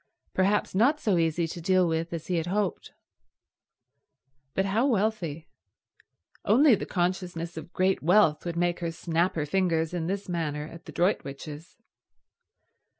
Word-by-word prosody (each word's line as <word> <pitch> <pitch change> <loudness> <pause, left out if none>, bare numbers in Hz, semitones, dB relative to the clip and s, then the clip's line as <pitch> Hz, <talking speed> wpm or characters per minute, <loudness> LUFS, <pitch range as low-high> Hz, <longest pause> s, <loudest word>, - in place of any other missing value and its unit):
Perhaps 200 +2 +1
not 255 +10 +3
so 200 - +1
easy 165 0 +1
to 170 +2 -7
deal 185 +1 +3
with 165 +1 -1
as 165 -2 -5
he 180 - -1
had 165 +1 -2
hoped. 195 -1 -2 1.6
But 190 - +1
how 220 +7 +2
wealthy. 195 - -1 1.0
Only 260 +5 +5
the 200 - -1
consciousness 175 -2 -2
of 160 +1 -8
great 185 +1 +1
wealth 170 -2 +4
would 170 -1 -4
make 175 0 +1
her 170 -1 -2
snap 170 +2 0
her 155 -3 -1
fingers 165 -1 0
in 170 -2 -2
this 195 +2 -3
manner 150 -4 -2
at 165 +1 -12
the - - -9
Droitwiches. 150 -3 -2
175 Hz, 150 wpm, -27 LUFS, 165-190 Hz, 1.6 s, Only